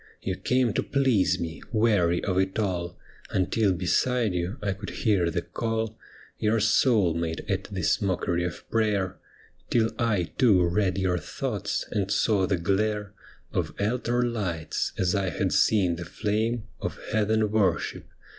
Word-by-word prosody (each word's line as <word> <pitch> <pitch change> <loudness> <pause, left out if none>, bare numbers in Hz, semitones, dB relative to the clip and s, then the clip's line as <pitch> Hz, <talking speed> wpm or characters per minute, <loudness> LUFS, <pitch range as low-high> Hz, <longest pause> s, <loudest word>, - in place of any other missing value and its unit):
You 95 - -3
came 125 +1 +1
to - - +1
please 130 -9 +2
me, 80 -1 -5
weary 105 -7 +2
of 95 -2 +1
it 95 0 0
all, 90 -4 -2 0.3
Until 100 +2 +1
beside 105 +5 +1
you 90 +6 -2
I 100 -2 -1
could 100 +1 -7
hear 100 -7 +1
the - - -2
call 110 -1 -2 0.4
Your 110 +1 +2
soul 105 -4 +3
made 80 -1 -3
at 95 0 -1
this 95 -5 0
mockery 90 -3 0
of 90 -3 -5
prayer, 105 -4 +1 0.5
Till 115 -2 +2
I 105 -7 +1
too 100 -9 +5
read 95 +1 +1
your 95 -2 +1
thoughts, - - -3
and 100 -2 -1
saw 100 -2 +2
the 95 - +1
glare 105 +3 0 0.4
Of - - -2
altar 120 +3 0
lights, 95 -10 -2
as 90 -1 +1
I 100 -2 0
had 75 - -1
seen 95 -6 +3
the 85 - -6
flame 110 +5 -1 0.2
Of - - -3
heathen 110 0 +2
worship. 105 -3 0
100 Hz, 155 wpm, -26 LUFS, 90-110 Hz, 0.5 s, too